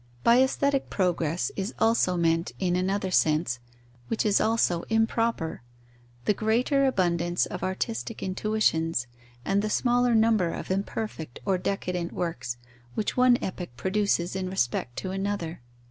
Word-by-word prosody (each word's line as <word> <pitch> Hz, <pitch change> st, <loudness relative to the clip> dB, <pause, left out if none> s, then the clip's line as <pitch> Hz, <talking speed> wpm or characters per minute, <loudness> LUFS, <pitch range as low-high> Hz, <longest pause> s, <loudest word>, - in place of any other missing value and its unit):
By 235 Hz, +2 st, +6 dB
aesthetic 275 Hz, +1 st, +1 dB
progress 175 Hz, -3 st, 0 dB
is 195 Hz, +3 st, -3 dB
also 225 Hz, -5 st, +2 dB
meant, 165 Hz, 0 st, +1 dB
in 180 Hz, -2 st, 0 dB
another 190 Hz, +1 st, 0 dB
sense, 155 Hz, -7 st, +2 dB, 0.5 s
which 225 Hz, -, -1 dB
is 205 Hz, -2 st, +3 dB
also 220 Hz, -6 st, +2 dB
improper, 225 Hz, -, 0 dB, 0.6 s
the -, -, +4 dB
greater 245 Hz, +7 st, +2 dB
abundance 175 Hz, -6 st, +1 dB
of 180 Hz, -, -6 dB
artistic 215 Hz, +4 st, -3 dB
intuitions 185 Hz, -, 0 dB, 0.4 s
and 195 Hz, +1 st, +2 dB
the 215 Hz, -, -2 dB
smaller 245 Hz, +1 st, +2 dB
number 220 Hz, -5 st, +3 dB
of -, -, -5 dB
imperfect 195 Hz, -, -3 dB
or 190 Hz, -2 st, +1 dB
decadent 180 Hz, -2 st, -2 dB
works 130 Hz, -8 st, -3 dB, 0.4 s
which 215 Hz, -, -1 dB
one 250 Hz, -1 st, +5 dB
epoch 180 Hz, -9 st, -5 dB
produces 190 Hz, -2 st, 0 dB
in 185 Hz, -1 st, -2 dB
respect 120 Hz, -8 st, -1 dB
to 185 Hz, -, -4 dB
another. 195 Hz, -6 st, -3 dB
190 Hz, 135 wpm, -27 LUFS, 170-220 Hz, 0.6 s, By